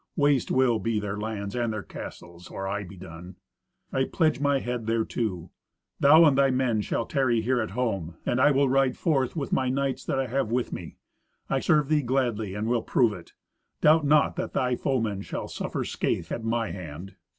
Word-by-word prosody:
Waste 145 -4 +2
will 130 -3 +3
be 110 +1 -1
their 105 -1 -3
lands 105 -1 -4
and 120 -2 0
their 110 -2 -4
castles, 85 0 -10
or 95 - -5
I 100 +1 -2
be 95 0 -11
done. 90 0 -10 0.6
I 130 0 +2
pledge 155 0 +1
my 145 -1 +2
head 120 -3 -4
thereto. 110 -6 -2 0.5
Thou 155 +4 +7
and 145 -3 +5
thy 135 0 +4
men 125 -4 +1
shall 115 - -2
tarry 130 -5 +1
here 125 +2 +1
at 110 - -3
home, 95 -10 -2
and 125 - +1
I 145 - +6
will 140 -1 +3
ride 135 0 +2
forth 135 -5 0
with 145 -4 -3
my 130 -1 +1
knights 135 0 -1
that - - -1
I 135 - 0
have 130 -1 -1
with 125 +1 -1
me. 85 -4 -7 0.5
I 135 - +2
serve 150 -1 +2
thee 155 0 +2
gladly, 120 -6 -1
and 105 +2 -2
will 120 -1 +1
prove 115 -2 +2
it. 90 -4 -12 0.5
Doubt 155 +1 +5
not 150 +1 +3
that - - -3
thy 125 -1 +1
foemen 115 -7 -1
shall - - -5
suffer - - -4
scathe - - -2
at 115 - -3
my 115 -1 -1
hand." 90 +1 -8
120 Hz, 200 wpm, -26 LUFS, 105-135 Hz, 0.6 s, Thou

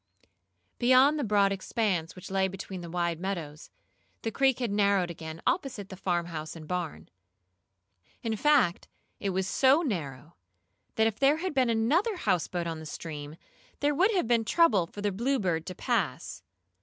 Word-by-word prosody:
Beyond 260 +5 +5
the - - 0
broad 200 -3 +3
expanse 190 -4 -1
which 185 +1 -10
lay 190 0 +2
between 190 -1 -7
the 170 - -8
wide 170 -1 -1
meadows, 170 -6 -5 0.5
the 225 - -1
creek 265 +1 +2
had 240 -4 -2
narrowed 200 -3 +2
again 160 -1 -8
opposite 270 - -1
the 190 - -7
farmhouse 170 -4 -3
and 155 -2 -10
barn. 180 -2 -4 1.2
In 225 -1 -1
fact, 265 -8 +2 0.3
it 200 - -2
was 190 0 -1
so 270 - +4
narrow, 155 - -4 0.6
that 220 - +3
if 220 -1 -1
there 280 +2 +4
had 370 0 -3
been 260 -3 +2
another 290 - +2
houseboat 175 - -1
on 165 -1 -4
the 160 - -8
stream, 150 -1 -7 0.4
there 290 +1 +2
would 365 +8 +3
have 360 - +1
been 235 -1 +3
trouble 220 - +3
for 205 - -9
the 205 0 0
Bluebird 195 - -1
to 185 - -5
pass. 180 - -2
195 Hz, 165 wpm, -28 LUFS, 170-250 Hz, 1.2 s, Beyond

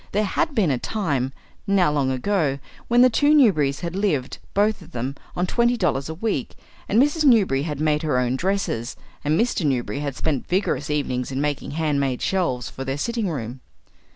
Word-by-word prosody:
There 210 +2 +2
had 280 +8 -1
been 190 -9 +3
a 130 - 0
time, 145 - -1 0.4
now 190 -5 +3
long 140 -3 +1
ago, 140 +1 0 0.3
when 240 +1 +5
the 255 - +7
two 290 +5 +4
Newberrys 155 - +3
had 170 0 -4
lived, 170 -11 -1 0.2
both 210 +1 +2
of 170 - -15
them, 125 +3 -3 0.2
on 180 - 0
twenty 235 +5 +2
dollars 155 -8 0
a 160 - -4
week, 185 - -2 0.3
and 215 - +3
Mrs. 295 +4 +3
Newberry 210 - +4
had 150 -1 -4
made 150 -1 +1
her 150 -5 0
own 125 0 +1
dresses, 170 - -1 0.3
and 150 +4 +1
Mr. 230 -6 +1
Newberry 135 -1 -1
had 140 -2 -3
spent 145 -2 -2
vigorous 180 -5 0
evenings 135 -4 -1
in 130 - -2
making 145 -1 -2
hand 150 -3 +1
made 135 -3 -1
shelves 140 -10 0
for 135 - -7
their 135 +1 -3
sitting 230 +4 -1
room. 125 -4 -5
155 Hz, 195 wpm, -23 LUFS, 135-200 Hz, 0.4 s, the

